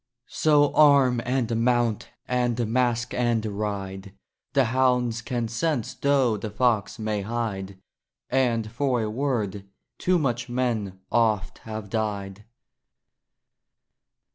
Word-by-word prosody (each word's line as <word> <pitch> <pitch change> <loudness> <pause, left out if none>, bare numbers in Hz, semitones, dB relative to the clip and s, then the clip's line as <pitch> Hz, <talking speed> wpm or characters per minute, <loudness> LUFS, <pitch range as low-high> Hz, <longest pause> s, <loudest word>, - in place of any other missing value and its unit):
So 145 -2 +3
arm 140 -5 +5
and 125 -2 0
mount! 120 -3 +1 0.2
and 120 -1 0
mask 120 +1 0
and 120 -2 +1
ride! 100 -2 -4 0.4
The 140 -1 +4
hounds 125 -1 +1
can 120 -2 -2
sense 125 +2 -1
though 135 -6 +2
the 105 +2 -5
fox 110 -1 0
may 110 -2 -2
hide! 100 -3 -4 0.5
And 120 -4 +1
for 125 -1 0
a 105 - -2
word 110 -6 -2 0.3
too 180 0 +2
much 120 -5 -1
men 115 -6 -2
oft 110 -5 +1
have 110 -3 -7
died. 105 -2 -3
115 Hz, 115 wpm, -25 LUFS, 105-125 Hz, 0.5 s, arm